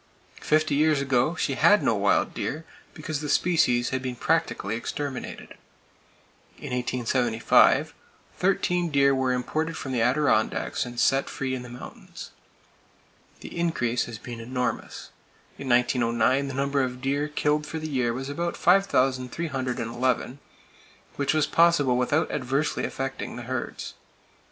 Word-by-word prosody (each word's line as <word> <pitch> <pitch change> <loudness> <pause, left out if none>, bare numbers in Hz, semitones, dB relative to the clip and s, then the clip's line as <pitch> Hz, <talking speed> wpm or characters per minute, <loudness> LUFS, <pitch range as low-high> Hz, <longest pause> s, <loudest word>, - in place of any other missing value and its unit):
Fifty 155 -1 +2
years 150 0 +3
ago, 140 +3 +1
she 140 - -1
had 205 +9 +4
no - - +3
wild 100 -1 +1
deer, 160 +4 -4 0.3
because 155 -2 -4
the 150 - -4
species 125 -10 +2
had 130 -1 -2
been 130 -1 -4
practically 160 -8 0
exterminated. 135 +3 -5 1.1
In - - -7
1875, 125 -2 +2 0.4
thirteen 180 -2 +1
deer 140 -2 +4
were 130 -1 +1
imported 155 +6 -2
from 135 - -5
the 125 -3 0
Adirondacks 125 -2 +1
and 120 0 -6
set 135 +1 +2
free 130 -1 -3
in 130 - -3
the 125 - -10
mountains. 120 +1 -10 1.1
The - - -9
increase 125 -9 0
has 120 -2 -7
been 120 0 -8
enormous. 125 +2 -4 0.5
In 135 - -5
1909 125 +2 +2
the 135 - -5
number 140 +1 +1
of 125 -1 -3
deer 140 +3 -1
killed 150 0 0
for 160 - -5
the 155 0 -4
year 130 -5 0
was 130 +3 -5
about 170 +4 -3
5,311, 130 - 0 0.8
which 140 +1 0
was 155 -1 +3
possible 165 -6 +3
without 125 +6 +1
adversely 135 +4 -1
affecting 135 0 -4
the 120 - -7
herds. 125 0 -5
135 Hz, 135 wpm, -26 LUFS, 125-150 Hz, 1.1 s, had